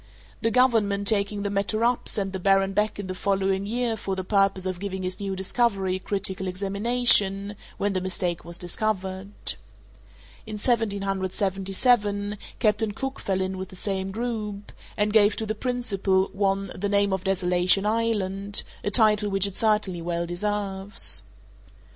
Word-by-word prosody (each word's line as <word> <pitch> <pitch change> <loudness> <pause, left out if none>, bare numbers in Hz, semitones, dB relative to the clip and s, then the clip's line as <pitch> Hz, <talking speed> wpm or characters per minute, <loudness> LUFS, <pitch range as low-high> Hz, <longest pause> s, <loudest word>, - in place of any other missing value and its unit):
The 225 - +2
government, 220 -5 +2
taking 200 -1 +2
the 200 - -2
matter 205 +3 0
up, 240 0 +1
sent 195 -2 -1
the 190 - -3
baron 195 +1 +2
back 210 +2 0
in 205 - -5
the 185 - -4
following 195 0 0
year 235 +1 -1
for 195 -2 -4
the 190 - -4
purpose 195 -1 +1
of 185 -1 -3
giving 190 -1 -4
his 185 0 -3
new 195 -1 -3
discovery 190 -1 0
a - - -10
critical 190 -1 -2
examination, 200 +1 +2 0.2
when 200 0 0
the 185 - -1
mistake 180 -2 -2
was 170 0 -7
discovered. 190 +1 -3 1.2
In 215 - -6
1777, 200 0 0 0.2
Captain 210 -1 +1
Cook 270 +4 -4
fell 190 -1 -1
in 190 0 -3
with 190 0 -6
the - - -12
same 190 0 -2
group, 210 -2 -4 0.3
and 210 0 +1
gave 210 -1 +5
to 220 - -3
the 215 - -2
principal 205 -5 0
one 195 -1 0
the 205 +2 -3
name 200 -1 +2
of 190 -1 -2
Desolation 185 0 +2
Island, 205 -3 0 0.2
a - - 0
title 210 -2 +4
which 195 0 +3
it 200 -2 -4
certainly 210 -5 +1
well 170 0 -2
deserves. 195 +2 +1
200 Hz, 160 wpm, -25 LUFS, 190-210 Hz, 1.2 s, gave